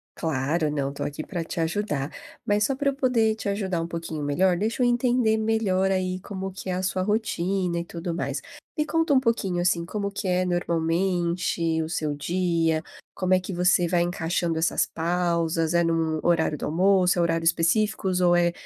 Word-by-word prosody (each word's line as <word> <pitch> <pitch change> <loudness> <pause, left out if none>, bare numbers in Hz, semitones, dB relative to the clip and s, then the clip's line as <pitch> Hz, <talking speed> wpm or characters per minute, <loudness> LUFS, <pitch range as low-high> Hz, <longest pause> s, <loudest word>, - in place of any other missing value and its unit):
Claro, 155 +1 0
não, 140 -2 -1
estou 140 - -5
aqui 145 +2 -4
pra 175 -4 -4
te 170 - -5
ajudar. 160 -4 -2 0.3
Mas 210 0 +2
só 270 - 0
pra 280 +1 +1
eu - - -1
poder 235 -5 +2
te 220 - -6
ajudar 195 -4 -1
um 165 - -3
pouquinho 165 -2 -5
melhor, 175 +6 +2
deixa 220 +6 0
eu - - +4
entender 240 -2 +2
melhor 215 -4 +1
aí 185 -1 -1
como 190 0 -6
que 190 0 -7
é - - 0
a 185 +1 -2
sua 185 0 0
rotina 190 -4 0
e 170 - -4
tudo 170 0 -5
mais. 170 - -3 0.4
Me 300 - +1
conta 325 -1 +1
um 265 - +6
pouquinho, 225 -8 0
assim, 170 -1 +1
como 200 +2 -3
que 200 -1 -4
é 180 0 +2
normalmente 170 -1 0
o 160 - -5
seu 155 -3 -1
dia, 165 0 0 0.3
como 185 0 +1
é 185 - +5
que 185 +1 -6
você 180 0 +3
vai 175 0 +2
encaixando 170 -1 -1
essas 160 +2 +1
pausas, 170 -1 0
é 170 - +4
em 165 - +1
um 160 -1 0
horário 160 -3 +2
do - - -4
almoço, 180 +3 +3
é - - +4
horários 165 -1 +2
específicos 185 +2 +1
ou 175 -1 +4
é 175 0 +3
180 Hz, 200 wpm, -25 LUFS, 165-200 Hz, 0.4 s, um